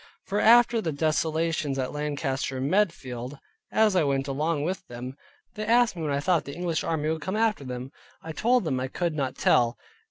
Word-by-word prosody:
For 205 +1 -1
after 235 0 +6
the 165 - -2
desolations 155 -1 0
at 130 -1 -2
Lancaster 145 -3 -2
and 130 +1 -1
Medfield, 135 - -1 0.3
as 215 -3 +3
I 180 - +4
went 135 -1 0
along 150 +2 -1
with 185 +4 -3
them, 125 +2 -7 0.4
they 215 - -5
asked 235 0 +3
me 170 - -6
when 155 - -2
I 140 - +1
thought 170 +2 +1
the 140 - -7
English 170 -2 -1
army 155 -2 -1
would 160 0 -2
come 190 +7 -2
after 220 -8 +1
them? 125 0 -6 0.3
I 160 - -8
told 240 +8 +2
them 135 -6 -1
I 130 - -2
could 170 +5 -2
not 135 -4 -2
tell. 120 0 +3
155 Hz, 200 wpm, -26 LUFS, 135-185 Hz, 0.4 s, after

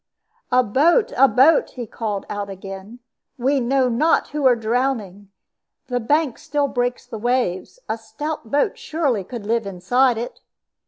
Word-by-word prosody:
"A 250 +1 +5
boat! 310 - +3
a 270 +2 +6
boat!" 275 +5 +4
he 245 -2 -5
called 210 -2 -4
out 205 -1 -4
again. 195 +4 -9 0.4
"We 270 +3 +1
know 260 +1 +2
not 255 +7 +2
who 290 -2 +1
are 250 - +5
drowning. 225 -4 -2 0.6
The 245 -1 0
bank 285 +2 +1
still 290 0 -1
breaks 245 -1 -2
the 220 - -7
waves; 240 - -1
a 225 - -2
stout 290 +3 -6
boat 290 - +1
surely 280 - -1
could 230 +2 -8
live 225 -1 0
inside 235 +7 +2
it." 235 +2 -5
245 Hz, 155 wpm, -21 LUFS, 215-270 Hz, 0.6 s, a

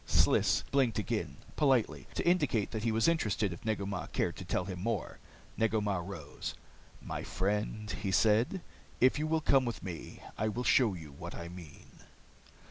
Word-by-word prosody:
Sliss - - +4
blinked 130 -6 +3
again, - - -2 0.2
politely, 120 - +2
to - - -1
indicate 145 - +2
that 110 - -3
he 115 - +2
was 110 +4 +3
interested 105 - +1
if 85 - -11
Negu 110 -3 -1
Mah 95 -2 -3
cared 85 - -1
to - - -6
tell 90 0 -1
him 90 -2 -5
more. 110 -2 -2 0.4
Negu 110 -1 +2
Mah 100 -3 0
rose. 85 -5 -6 0.5
"My - - -4
friend," 105 +2 -2
he 95 - -2
said, 115 - +3 0.4
"if 130 +3 +4
you 155 - 0
will 160 0 +1
come 135 -3 +4
with 120 -3 -4
me, 90 -4 -7 0.2
I 110 - +1
will 120 +3 -2
show 120 -6 +4
you 80 -4 -9
what 70 - -8
I 85 0 -6
mean." 85 -4 -12
105 Hz, 180 wpm, -32 LUFS, 95-120 Hz, 0.5 s, Sliss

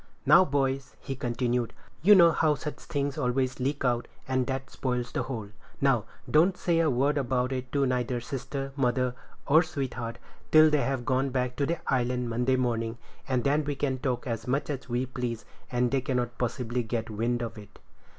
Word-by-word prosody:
"Now, - - +8
boys," 135 -4 -1
he 135 - -5
continued, 120 -1 -1 0.3
"you 205 +6 +8
know 170 -3 +7
how 155 -1 +2
such 150 +1 -6
things 145 -2 -3
always 130 0 0
leak 135 +2 -1
out, 120 -1 +1 0.2
and 130 -1 0
that 135 0 -3
spoils 125 -2 -2
the - - -1
whole. 110 -6 -5 0.3
Now, 130 -6 +2 0.2
don't 175 +5 +4
say 170 -2 +1
a 165 -2 +3
word 140 +3 +2
about 125 -1 0
it 130 -1 -4
to 140 -1 +3
neither 125 -1 0
sister, 135 +2 -5
mother, 125 -2 +1 0.3
or 155 +3 +6
sweetheart, 130 -7 -4 0.3
till 155 0 +7
they 150 -2 +3
have 135 -3 -1
gone 130 +1 +1
back 125 -1 -1
to 140 - +1
the 170 - 0 0.2
island 125 -1 0
Monday 125 +3 +2
morning, 115 -2 -1 0.3
and 125 -2 0
then 145 +2 +2
we 145 0 -2
can 135 -1 -1
talk 125 -2 -2
as 115 0 -4
much 140 +4 0
as 135 -2 -6
we 120 +2 0
please, 125 -3 -4 0.3
and 125 -1 +1
they 135 -1 +2
cannot 125 -3 -1
possibly 120 0 -1
get 115 0 -3
wind 120 +3 -1
of 115 - -5
it." 105 - -14
130 Hz, 190 wpm, -28 LUFS, 120-140 Hz, 0.3 s, Now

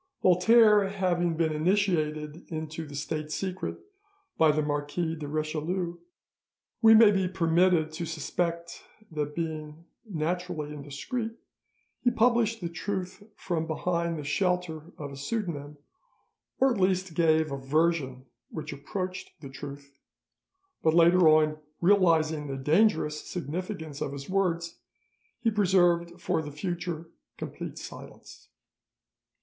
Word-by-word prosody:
Voltaire 210 +2 +6
having 175 -4 0
been 160 -2 +1
initiated 155 -3 0
into 160 0 -5
the 145 - -9
state 155 +1 -3
secret 185 +2 -3 0.6
by 160 - +5
the 155 0 0
Marquis 150 +3 -2
de 150 -2 -6
Richelieu, 160 +4 -2 0.8
we 225 -1 +8
may 220 -1 +8
be 190 -2 +1
permitted 170 -2 +2
to 165 +1 -4
suspect 170 +2 -3 0.3
that 150 -1 -3
being 160 -1 -5 0.2
naturally 175 -5 -3
indiscreet 150 - -4 0.7
he 245 - +3
published 235 -2 +2
the 170 - -3
truth 190 +2 -4
from 165 -3 -2
behind 170 +1 -1
the 150 - -5
shelter 175 0 -1
of 145 -2 -6
a - - -8
pseudonym, 150 -3 -4 0.8
or 265 -1 +4
at 195 - -3
least 185 -1 +1
gave 160 -2 +3
a 140 - -2
version 135 -2 0 0.2
which 155 -2 -6
approached 185 +6 -5
the 140 -3 -9
truth, 140 0 -10 0.8
but 160 0 +3
later 170 0 +6
on 155 0 +4 0.2
realising 165 -5 +3
the 135 -1 -4
dangerous 150 +1 +2
significance 160 -1 -5
of 140 - -2
his 140 0 -7
words, 175 -3 -1 0.6
he 230 -1 +2
preserved 175 -4 +2
for 160 - 0
the 150 -1 -7
future 170 +1 -4 0.3
complete - - -6
silence. - - -11
165 Hz, 125 wpm, -28 LUFS, 150-185 Hz, 0.8 s, we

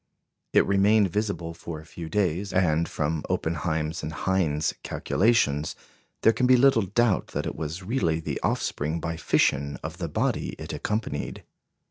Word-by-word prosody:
It - - +5
remained 100 0 +4
visible 100 -5 -2
for 80 -1 -7
a 80 - -13
few 80 0 -8
days, 95 +1 0
and, 85 -3 +2
from 75 +1 -1
Oppenheim's 80 -1 -1
and 75 - -4
Hind's 80 -3 0
calculations, 85 -9 +1 0.5
there 115 - +6
can 125 - +1
be 130 0 +7
little 130 -2 +5
doubt 110 +1 +2
that - - -1
it - - -3
was 80 +4 -5
really 90 -7 0
the 80 - -3
offspring 80 +3 -1
by 80 +1 -3
fission 70 -2 +1
of 80 +3 -6
the 85 -3 -3
body - - -1
it - - -7
accompanied. 75 - -3
85 Hz, 155 wpm, -26 LUFS, 80-100 Hz, 0.5 s, be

